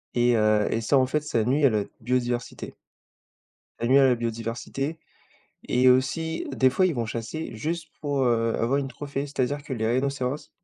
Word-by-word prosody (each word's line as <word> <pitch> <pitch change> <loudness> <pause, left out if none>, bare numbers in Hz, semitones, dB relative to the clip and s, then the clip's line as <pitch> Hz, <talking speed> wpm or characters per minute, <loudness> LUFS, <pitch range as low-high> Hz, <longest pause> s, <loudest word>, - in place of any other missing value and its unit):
Et 120 0 +3
heu 105 -1 +3
et 115 - 0
ça, 125 +5 +3
en 130 - +4
fait, 150 +3 -1
ça 120 -7 0
nuit 140 +6 +2
à 135 - +7
notre 105 -2 -1
biodiversité. 120 0 -2 1.1
Ça 120 - -1
nuit 130 - +5
à 135 - +6
la 125 - +3
biodiversité 115 +6 -4 0.7
et 125 +1 +5
aussi, 160 +6 0
des 130 0 +3
fois, 185 +7 +3
ils 170 - 0
vont 120 - -1
chasser 115 +7 -5
juste 160 +7 -4
pour, 145 -2 -1
heu, 115 -2 +1
avoir 130 +5 +1
une 135 - -2
trophée, 140 +2 -5
c'est-à-dire 140 0 -2
que 140 -2 -5
les 110 -2 -1
rhinocéros, 130 +3 -1
130 Hz, 185 wpm, -25 LUFS, 115-140 Hz, 1.1 s, à